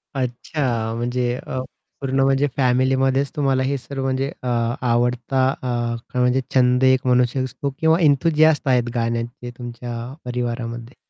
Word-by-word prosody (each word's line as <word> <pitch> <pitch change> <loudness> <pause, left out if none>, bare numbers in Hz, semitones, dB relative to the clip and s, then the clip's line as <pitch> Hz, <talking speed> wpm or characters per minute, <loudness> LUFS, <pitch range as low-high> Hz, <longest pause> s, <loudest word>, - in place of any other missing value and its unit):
अच्छा 125 -2 -2
म्हणजे 120 +1 -1
अ, 130 - -4 0.4
पूर्ण 135 0 -1
म्हणजे 135 +1 +3
फॅमिलीमध्येच 130 +1 +2
तुम्हाला 135 -3 +1
हे 140 +1 0
सर्व 135 +2 -6
म्हणजे 135 +2 -1
अ, - - -3 0.4
आवडता 120 +2 +1
अ, 120 -2 -1 0.2
म्हणजे 125 +1 +3
छंद 125 0 +4
एक 130 0 +4
म्हणू 125 0 +5
शकतो 130 +1 -2
किंवा 160 +2 +3
एन्थूसियास्ट 155 0 +3
आहेत 125 -2 +2
गाण्याचे 115 +1 -2
तुमच्या 120 0 -6
परिवारामध्ये. 120 -1 -4
125 Hz, 130 wpm, -21 LUFS, 120-135 Hz, 0.4 s, म्हणू